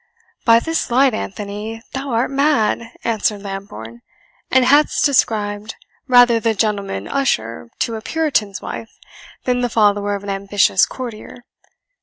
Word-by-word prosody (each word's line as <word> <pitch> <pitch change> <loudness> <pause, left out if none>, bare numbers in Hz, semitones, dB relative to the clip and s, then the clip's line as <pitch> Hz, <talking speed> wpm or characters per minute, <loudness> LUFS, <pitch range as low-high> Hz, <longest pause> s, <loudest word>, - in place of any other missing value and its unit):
"By 230 0 +6
this 325 +4 -2
light, 260 +1 +4
Anthony, 210 +2 -5
thou 275 +1 -4
art 235 +2 0
mad," 270 -5 +1
answered 210 -2 -1
Lambourne, 120 - -8 0.5
"and 260 -1 +4
hast 290 +4 +4
described 215 -6 0 0.3
rather 245 -2 +6
the 225 0 0
gentleman 200 - -2
usher 115 - -1
to 230 - 0
a 220 - -6
puritan's 245 -10 -1
wife, 225 - -7 0.5
than 250 -1 0
the 245 - 0
follower 205 -2 +2
of 200 - -7
an 200 - -6
ambitious 195 0 +2
courtier! 245 -1 -8
220 Hz, 135 wpm, -19 LUFS, 200-250 Hz, 0.5 s, By